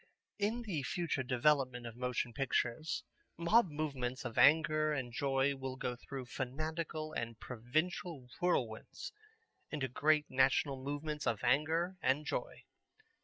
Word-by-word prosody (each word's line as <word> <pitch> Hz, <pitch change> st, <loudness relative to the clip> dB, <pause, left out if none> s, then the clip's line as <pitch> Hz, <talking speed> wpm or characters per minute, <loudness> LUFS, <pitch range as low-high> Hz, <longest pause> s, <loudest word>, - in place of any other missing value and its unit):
In 220 Hz, +4 st, 0 dB
the 180 Hz, -10 st, -2 dB
future 165 Hz, 0 st, -1 dB
development 130 Hz, -1 st, +2 dB
of 115 Hz, -1 st, -7 dB
motion 125 Hz, -1 st, -1 dB
pictures 135 Hz, +2 st, 0 dB, 0.3 s
mob 185 Hz, +5 st, +4 dB
movements 135 Hz, -5 st, -3 dB
of 120 Hz, -, -4 dB
anger 155 Hz, +3 st, +5 dB
and 130 Hz, -5 st, -2 dB
joy 135 Hz, +1 st, +2 dB
will 135 Hz, -1 st, -4 dB
go 125 Hz, -1 st, -2 dB
through 130 Hz, +1 st, -7 dB
fanatical 155 Hz, +5 st, -3 dB
and 115 Hz, -1 st, -4 dB
provincial 140 Hz, +4 st, -2 dB
whirlwinds 125 Hz, -11 st, -1 dB, 0.6 s
into 145 Hz, -3 st, -1 dB
great 150 Hz, +4 st, +3 dB
national 130 Hz, +1 st, +2 dB
movements 145 Hz, +1 st, -3 dB
of 110 Hz, -, 0 dB
anger 160 Hz, +8 st, +2 dB
and 140 Hz, +4 st, +2 dB
joy. -, -, -3 dB
140 Hz, 125 wpm, -35 LUFS, 125-155 Hz, 0.6 s, anger